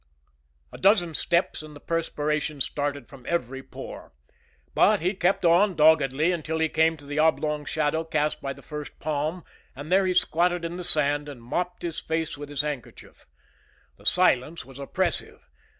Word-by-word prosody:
A - - -9
dozen 190 -4 +3
steps 170 +3 0
and 155 -1 -12
the - - -11
perspiration 150 -2 -2
started 145 -1 -3
from 135 -3 -14
every 135 -6 -2
pore. 135 - -10 0.6
But - - +4
he 180 +5 0
kept 185 -1 +1
on, 180 +3 +4
doggedly, 155 0 +4
until 160 -2 -3
he 160 0 +1
came 160 +1 +2
to 145 - -14
the 145 +2 -3
oblong 155 -1 +1
shadow 155 +2 0
cast 155 -2 -1
by 135 0 -4
the 140 - -16
first 150 -1 -8
palm, 155 +3 -3 0.3
and 145 +5 -8
there 190 0 +4
he 185 - 0
squatted 175 0 +1
in 170 +1 -5
the 180 - -5
sand 145 -2 +5
and 140 -4 -9
mopped 180 +9 -3
his 170 -2 -3
face 160 0 -3
with 145 0 -9
his 145 -1 0
handkerchief. 145 -5 -8 0.7
The - - -10
silence 165 -5 +3
was 135 +1 -13
oppressive. 175 +6 -3
155 Hz, 170 wpm, -25 LUFS, 145-170 Hz, 0.7 s, sand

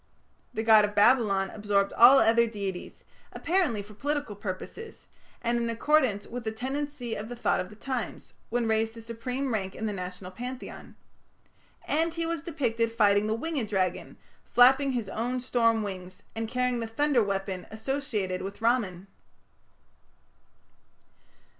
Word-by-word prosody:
The 220 - -3
god 220 -1 +7
of 210 0 -1
Babylon 205 -3 +4
absorbed 205 -2 0
all 245 +4 +8
other 230 0 +4
deities, 200 -5 -6 0.3
apparently 330 - 0
for 210 +1 -14
political 285 -1 -2
purposes, 205 - -7 0.4
and 235 0 +1
in 235 0 -1
accordance 230 -3 +2
with 245 +1 -6
the 220 - -2
tendency 265 +1 -4
of 215 +1 -5
the 245 - -5
thought 240 - +1
of 185 - -4
the 210 - -13
times, 250 +1 -5 0.2
when 240 0 0
raised 220 0 +1
to 230 - -9
supreme 250 +3 -3
rank 190 -3 -2
in 220 - -4
the 210 - -1
national 180 0 -6
pantheon; 250 +6 -8 0.9
and 325 +2 0
he 335 0 -1
was 335 -2 -2
depicted 240 -8 -1
fighting 205 -2 +3
the 215 - 0
winged 265 -3 -3
dragon, 185 -3 -1 0.3
flapping 265 +3 +5
his 235 -5 -2
own 240 +5 -2
storm 230 -3 +2
wings, 185 -2 -7
and 225 0 -2
carrying 250 0 0
the 230 - -3
thunder 270 +2 +2
weapon 195 -2 -3
associated 220 -6 -3
with 195 +1 -6
Ramman. 220 -6 0
230 Hz, 150 wpm, -28 LUFS, 205-255 Hz, 0.9 s, all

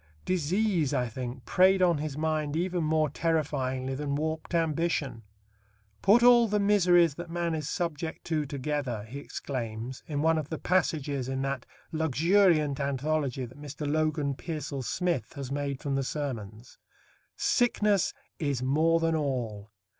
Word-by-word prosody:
Disease, 180 -3 +1
I 125 -2 +1
think, 125 +1 -6
preyed 190 +5 +4
on 170 -4 +3
his 150 -2 -4
mind 155 -1 -1
even 175 0 0
more 155 0 +2
terrifyingly 135 -4 -1
than 140 +1 -2
warped 160 +3 -2
ambition. 165 -6 0 0.8
"Put 220 +5 +5
all 240 -1 +7
the 210 0 +1
miseries 180 -5 +4
that 170 +3 -8
man 170 0 -1
is 155 -2 -3
subject 165 -2 -3
to 155 -3 -1
together," 140 -5 -3
he 125 +6 -8
exclaims 125 -3 -5
in 145 -1 -2
one 160 0 +3
of 155 -1 -6
the 160 - -3
passages 145 -7 0
in 135 0 -2
that 135 -2 -3 0.2
luxuriant 160 - +3
anthology 140 -1 -1
that 130 +4 -13
Mr. 150 +1 -5
Logan 150 -1 0
Pearsall 145 -2 -5
Smith 170 - -1
has 135 -2 -6
made 140 -1 -2
from 140 - -3
the 135 0 +1
Sermons; 120 -6 -5 0.6
"sickness 210 -5 +2 0.3
is 140 -5 -1
more 160 +5 +3
than 165 0 +1
all 120 -8 -2
150 Hz, 145 wpm, -28 LUFS, 135-165 Hz, 0.8 s, all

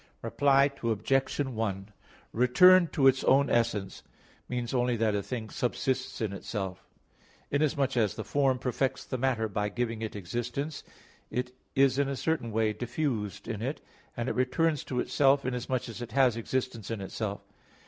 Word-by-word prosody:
Reply 140 0 +3
Obj. 130 +4 0
1: 110 -7 -2 0.4
Return 170 +10 +6
to 140 -3 0
its 135 0 +5
own 135 0 +4
essence 115 -4 0 0.5
means 125 -1 -3
only 125 -1 +2
that 110 -1 +1
a 100 - 0
thing 110 0 -5
subsists 130 +1 -2
in 105 -3 -1
itself. 95 -2 -5 0.6
Inasmuch 140 -2 +1
as 110 -5 +1
the - - -4
form 135 -2 +1
perfects 125 +1 -1
the 130 - -4
matter 120 -4 +1
by 105 0 -2
giving 115 +1 -3
it 110 -1 -4
existence, 120 - -4 0.5
it 125 0 -3 0.2
is 135 0 +4
in 140 -1 +2
a 140 - -2
certain 145 -5 -1
way 110 0 +1
diffused 120 -5 -3
in 110 -3 -4
it; 135 +6 -3 0.4
and 120 +1 -2
it - - 0
returns 150 +4 +1
to 125 - -2
itself 140 +1 +3
inasmuch 125 0 -2
as 115 +1 -8
it 115 -2 -7
has 130 -3 +4
existence 115 -1 -3
in 115 -2 -3
itself. 100 +1 -4
125 Hz, 160 wpm, -29 LUFS, 110-135 Hz, 0.6 s, Return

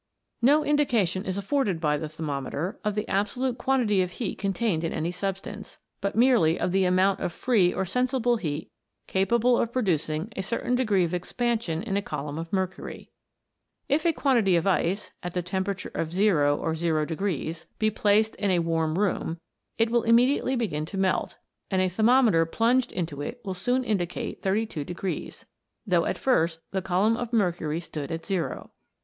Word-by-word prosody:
No 295 +5 +4
indication 225 -11 +1
is 190 0 -2
afforded 200 - 0
by 150 -2 +1
the 150 +1 -4
thermometer 155 - -4
of 210 -1 -1
the 210 - -2
absolute 240 +6 -1
quantity 240 -7 +2
of 180 0 -2
heat 230 0 -4
contained 195 -4 0
in 165 - -1
any 165 +2 -2
substance, 195 +2 -5 0.2
but 200 0 -2
merely 230 -9 +4
of 180 - 0
the 190 0 +3
amount 185 +2 +3
of - - -2
free 195 -2 +2
or 190 - -2
sensible 250 +3 +1
heat 155 -6 -4 0.3
capable 235 +6 +2
of 235 - 0
producing 175 - -1
a - - -2
certain 230 +5 -2
degree 215 -7 +2
of 170 0 -2
expansion 205 -1 -1
in 200 -4 -1
a - - +1
column 150 -3 -5
of 165 0 -6
mercury. 190 -1 -4 0.8
If 290 +3 +1
a 335 - +4
quan 275 -4 +2
tity 195 -6 +3
of 170 - 0
ice, 195 +1 0
at 175 0 -6
the 180 - 0
temperature 190 +2 -3
of 160 - -2
zero, 170 -7 +3
or 160 - -2
0, 160 -2 0 0.7
be 215 0 +2
placed 215 +1 +2
in 205 - 0
a 185 - +3
warm 165 -1 0
room, 185 -4 0 0.4
it 225 0 +2
will 240 0 +3
immediately 250 +4 +3
begin 155 -11 -2
to 195 - -6
melt, 190 -1 0 0.3
and 190 - +1
a 185 0 +2
thermometer 220 -4 +4
plunged 235 +7 +2
into 160 -5 -4
it 235 +11 -5
will 190 - -2
soon 245 +8 0
indicate 190 -7 -2
32, 190 -3 -2 0.5
though 180 -5 +2
at - - -1
first 165 -10 +1
the 190 - -1
column 195 +5 +2
of 240 0 -4
mercury 175 -8 0
stood 155 -4 -6
at 165 0 -4
zero. 190 -4 -3
195 Hz, 175 wpm, -26 LUFS, 170-230 Hz, 0.8 s, No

